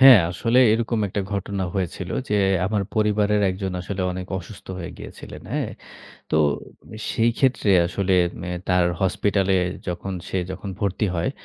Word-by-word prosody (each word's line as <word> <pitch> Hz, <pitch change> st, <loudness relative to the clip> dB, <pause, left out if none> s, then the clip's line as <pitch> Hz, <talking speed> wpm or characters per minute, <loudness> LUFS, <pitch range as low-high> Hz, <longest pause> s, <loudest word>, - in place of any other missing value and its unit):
হ্যাঁ, 130 Hz, -3 st, +11 dB
আসলে 115 Hz, +7 st, +1 dB
এরকম 115 Hz, 0 st, 0 dB
একটা 100 Hz, -, -2 dB
ঘটনা 100 Hz, -1 st, -2 dB
হয়েছিল 90 Hz, -1 st, -3 dB, 0.2 s
যে, 105 Hz, -, +1 dB, 0.3 s
আমার 105 Hz, 0 st, 0 dB
পরিবারের 105 Hz, -1 st, +2 dB
একজন 95 Hz, 0 st, -3 dB
আসলে 95 Hz, +1 st, -3 dB
অনেক 90 Hz, 0 st, -5 dB
অসুস্থ 95 Hz, +3 st, -11 dB
হয়ে 85 Hz, -, -5 dB
গিয়েছিলেন, -, -, -9 dB
হ্যাঁ? -, -, -1 dB, 0.6 s
তো -, -, +2 dB, 0.7 s
সেই 115 Hz, +1 st, +3 dB
ক্ষেত্রে 130 Hz, -6 st, +2 dB, 0.2 s
আসলে 95 Hz, +2 st, -1 dB, 0.4 s
এ -, -, -3 dB, 0.2 s
তার 90 Hz, -1 st, +4 dB, 0.2 s
হসপিটালে 95 Hz, +1 st, +2 dB, 0.3 s
যখন 90 Hz, +2 st, -3 dB, 0.2 s
সে -, -, -2 dB
যখন 95 Hz, +1 st, -5 dB
ভর্তি 100 Hz, +1 st, 0 dB
হয়, 85 Hz, +7 st, 0 dB
100 Hz, 145 wpm, -23 LUFS, 95-105 Hz, 0.7 s, হ্যাঁ